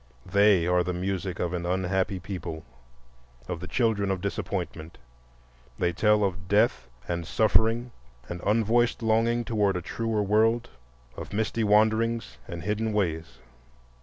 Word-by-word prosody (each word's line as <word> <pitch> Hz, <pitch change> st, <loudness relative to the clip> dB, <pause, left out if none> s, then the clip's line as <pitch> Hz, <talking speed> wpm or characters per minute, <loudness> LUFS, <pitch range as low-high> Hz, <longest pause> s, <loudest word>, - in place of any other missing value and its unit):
They 100 Hz, -4 st, +4 dB
are 90 Hz, 0 st, +2 dB
the 90 Hz, 0 st, -3 dB
music 95 Hz, 0 st, -3 dB
of 90 Hz, 0 st, -1 dB
an 85 Hz, -1 st, -2 dB
unhappy 95 Hz, +2 st, 0 dB
people, 85 Hz, -4 st, -6 dB, 0.8 s
of 85 Hz, -, -4 dB
the 90 Hz, -, -7 dB
children 110 Hz, -4 st, +1 dB
of 95 Hz, -1 st, 0 dB
disappointment; 90 Hz, -4 st, -4 dB, 0.8 s
they 90 Hz, -1 st, 0 dB
tell 105 Hz, +3 st, +3 dB
of 90 Hz, -2 st, -2 dB
death 105 Hz, +5 st, +2 dB, 0.2 s
and 85 Hz, -1 st, -2 dB
suffering 115 Hz, +2 st, +2 dB, 0.4 s
and 85 Hz, 0 st, -6 dB
unvoiced 115 Hz, +3 st, +2 dB
longing 115 Hz, +2 st, +2 dB
toward 105 Hz, -4 st, +1 dB
a -, -, -3 dB
truer 110 Hz, +2 st, -1 dB
world, 110 Hz, +3 st, +2 dB, 0.5 s
of -, -, -8 dB
misty 110 Hz, +2 st, -1 dB
wanderings 110 Hz, -, +2 dB
and 85 Hz, -1 st, -6 dB
hidden 105 Hz, +2 st, -1 dB
ways. 85 Hz, -6 st, -2 dB
100 Hz, 135 wpm, -27 LUFS, 90-110 Hz, 0.8 s, They